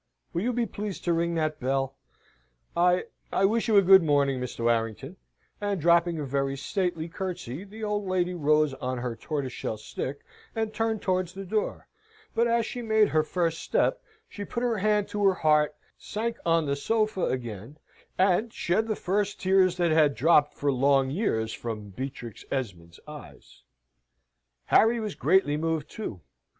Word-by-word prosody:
Will 170 - -1
you 240 +5 0
be 240 -1 0
pleased 205 -2 -6
to 175 - +1
ring 170 0 0
that 155 -1 -1
bell? 135 +1 -1 0.8
I 180 +1 +3 0.3
I 195 - +2
wish 225 +3 +1
you 215 -2 +4
a 200 - +7
good 190 +1 +8
morning, 140 -4 +2
Mr. 125 -2 -5
Warrington," 115 - -1 0.5
and 205 -2 -1
dropping 170 +1 +3
a 150 - -3
very 135 0 -1
stately 170 +2 -2
curtsey, 175 -4 -5
the 215 +2 -10
old 210 -1 -1
lady 180 -1 0
rose 155 -3 +2
on 130 -1 -4
her 120 -1 -3
tortoiseshell 130 -3 -4
stick, 130 +5 -5 0.3
and 220 -1 -2
turned 225 -1 -1
towards 185 -2 0
the 195 0 -7
door. 210 +3 -2 0.5
But, 235 +1 +2
as 235 -1 +2
she 245 - -5
made 220 -2 +3
her 155 - +3
first 165 +1 -1
step, - - +1 0.3
she 205 - -7
put 235 +4 -4
her 235 -4 0
hand 210 0 +2
to 205 0 -2
her 195 -2 +4
heart, 150 -2 +2 0.2
sank 230 +2 -3
on 165 -1 +3
the 140 -1 0
sofa 215 +5 0
again, 120 +1 -5 0.4
an 190 +4 +3
shed 215 +1 0
the 215 - 0
first 200 +2 -1
tears 185 -1 +3
that 175 -2 +2
had 155 -3 +4
dropped 150 0 +4
for 145 0 0
long 135 0 +3
years 110 - -1
from 110 -3 -6
Beatrix 125 -1 -7
Esmond's 90 -10 -5
eyes. 145 - -12 1.0
Harry 230 +2 +4
was 215 -2 -3
greatly 150 0 +2
moved, 160 -1 -2
too. 115 - -6
170 Hz, 170 wpm, -27 LUFS, 135-200 Hz, 1.0 s, good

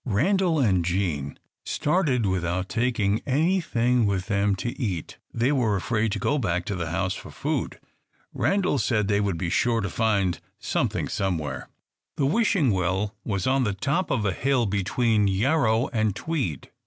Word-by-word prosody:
Randal 170 - +2
and 100 - +2
Jean 85 -6 -2 0.3
started 145 - +1
without 95 0 -1
taking 115 -4 0
anything 130 - +2
with 95 -2 -1
them 100 -1 +1
to 120 +5 -3
eat. 95 -9 -3
They 120 +4 +1
were 120 -7 +2
afraid 110 +2 0
to - - -1
go 150 - 0
back 90 -6 -1
to 100 - -3
the 85 -3 -3
house 95 +3 -1
for - - -9
food. - - -3 0.5
Randal 190 -7 +1
said 105 -3 +1
they 100 0 +2
would 100 -4 -1
be 85 +1 -2
sure 115 +3 +2
to 100 -4 -3
find 100 -5 +1 0.2
something - - -1
somewhere. 85 -6 -3 0.5
The 140 - +1
Wishing 170 - +2
Well 95 +2 0
was 100 -4 -2
on 130 0 +2
the 105 -4 0
top 140 - -1
of 110 -5 0
a 95 - +1
hill 130 +2 +1
between 105 +2 +1
Yarrow 115 +3 +2
and 110 -4 0
Tweed. 130 - -3
110 Hz, 165 wpm, -25 LUFS, 95-130 Hz, 0.5 s, Randal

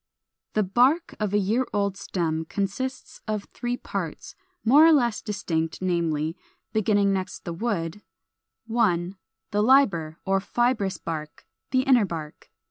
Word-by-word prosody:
431. 215 -3 +2 0.3
=The - - -10
Bark= 340 - -17
of 210 -2 -1
a 205 - +3
year 220 +6 +1
old 200 -2 0
stem 160 -4 -2
consists 205 +9 -4
of 215 -2 -2
three 245 0 -2
parts, - - -5 0.3
more 280 +7 +7
or 325 - +8
less 240 -7 +2
distinct, 165 -6 -2
namely, 165 -3 0 0.4
beginning 205 -2 +3
next 190 -1 -4
the 170 - -3
wood, 180 -2 -2 0.6
1. 195 -6 +1 0.4
The 205 - +2
LIBER 200 - +3
or 195 0 +2
FIBROUS 205 -3 0
BARK, 155 -5 -6 0.2
the 255 0 +3
Inner 255 -5 +5
Bark. 160 -4 -7
200 Hz, 140 wpm, -25 LUFS, 170-235 Hz, 0.6 s, or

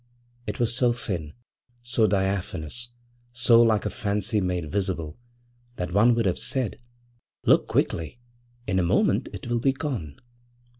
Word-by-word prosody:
It - - -4
was 120 -1 +1
so 125 -2 +3
thin, 90 -10 -4 0.5
so 120 -2 +2
diaphanous, 95 +2 -2 0.4
so 120 -1 +5
like 110 -3 +3
a - - -1
fancy 105 +1 -1
made 90 -4 -2
visible, 95 -4 -2 0.6
that 90 -3 -4
one 115 +4 +5
would 115 -2 +1
have 90 - +1
said: 130 -5 -1 0.7
'Look - - +4
quickly! 80 +9 -1 0.5
in 95 -2 +1
a - - +2
moment 85 - +2
it - - -8
will 120 0 0
be 135 +3 +2
gone.' 125 - -4
105 Hz, 145 wpm, -25 LUFS, 90-120 Hz, 0.7 s, so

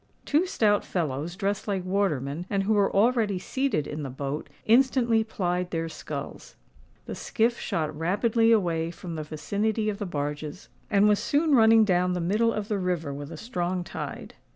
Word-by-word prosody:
Two 315 +5 +2
stout 210 - +2
fellows, 160 -1 -3
dressed 200 +2 -2
like 195 -3 -1
watermen, 175 -5 -1
and 200 -1 0
who 215 +3 +2
were 200 -2 +3
already 215 -2 +2
seated 260 - -1
in 150 +1 -5
the 140 - -4
boat, 140 +3 -4 0.2
instantly 235 -1 +4
plied 180 -4 -2
their 165 -1 -2
sculls. 155 -3 -7 0.5
The - - -5
skiff 235 +2 0
shot 155 -2 -2
rapidly 220 +8 +2
away 170 -7 +2
from 170 0 -8
the 155 - -4
vicinity 205 +9 -1
of 205 0 -4
the 205 - -3
barges, 150 +2 -4 0.2
and 205 -1 +4
was 210 -1 +4
soon 300 +1 +1
running 225 -2 +6
down 180 -2 +2
the 180 - -1
middle 210 +7 +2
of 210 -2 -3
the 210 -2 -1
river 175 -6 -2
with 145 +2 -7
a 165 - -7
strong 180 -3 -2
tide. - - -7
190 Hz, 175 wpm, -26 LUFS, 160-220 Hz, 0.5 s, running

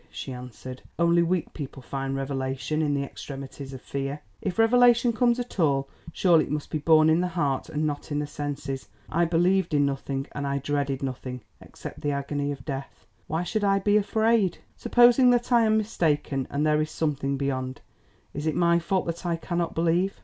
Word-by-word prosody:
she 80 - -6
answered; 125 +1 -9 0.2
"only 170 0 +4
weak 170 0 0
people 140 -2 -7
find 135 +1 -4
revelation 135 +2 -2
in 145 -2 +1
the 140 - 0
extremities 135 0 -8
of 130 - -7
fear. 140 +1 -4 0.2
If 190 -3 -3
revelation 240 +1 +5
comes 240 +2 +2
at 245 -4 -6
all, 140 -4 +2 0.2
surely 165 -2 +4
it - - -11
must 150 0 -3
be 155 - -1
born 155 +1 +5
in 160 +2 +4
the 180 - 0
heart 145 -7 -1
and 155 +1 -1
not 145 0 -4
in 145 - 0
the 150 - -1
senses. 145 -2 -5 0.2
I 170 +2 +2
believed 175 0 +2
in 145 -1 +4
nothing, 135 0 -2
and 140 -1 -4
I 140 0 0
dreaded 140 -1 -2
nothing, 130 -1 -5 0.2
except - - -10
the 145 - -1
agony 140 +1 -2
of 135 -3 -7
death. 135 -1 -6 0.2
Why 160 +3 -1
should 210 +4 -2
I 195 -1 +3
be 205 +1 +2
afraid? 220 -2 +2 0.2
Supposing 245 +1 +5
that 245 0 +2
I 235 -2 +5
am 215 0 +3
mistaken, 155 - 0
and 145 +2 0
there 150 0 +3
is 155 - -2
something 140 -3 -1
beyond, 130 -2 -3 0.5
is 145 +2 -3
it 155 - 0
my 170 0 +3
fault 190 +2 0
that 170 +1 -4
I 170 -2 0
cannot 170 0 -3
believe? 170 +4 +1
155 Hz, 195 wpm, -26 LUFS, 140-180 Hz, 0.5 s, revelation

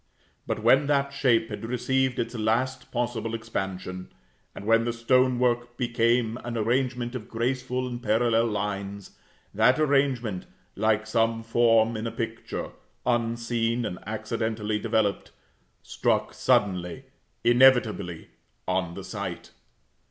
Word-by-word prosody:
But 110 - -2
when 135 +5 +5
that 140 -1 +1
shape 115 -5 +2
had 105 -1 -6
received 130 +2 0
its 115 +1 -2
last 120 +4 -1
possible 120 -2 -2
expansion, 95 -4 -5 0.4
and 100 - -8
when 115 +1 +4
the 120 0 -1
stone 125 +2 +3
work 120 -1 0
became 120 -1 +1
an 120 -1 -4
arrangement 120 +2 0
of 120 -5 -6
graceful 125 +2 -1
and 120 -1 -5
parallel 115 +1 +2
lines, 100 -1 -4 0.4
that 115 +7 +4
arrangement, 135 -9 +1 0.3
like 110 +1 +1
some 115 0 +1
form 115 0 +3
in 110 +1 -3
a - - -3
picture, 115 0 -5 0.3
unseen 115 0 0
and 90 - -4
accidentally 110 0 -2
developed, 110 -2 0 0.5
struck - - 0
suddenly, 90 +2 +1 0.4
inevitably, 120 -8 +3 0.4
on 90 -2 -1
the - - -7
sight. - - -6
115 Hz, 120 wpm, -26 LUFS, 110-125 Hz, 0.5 s, when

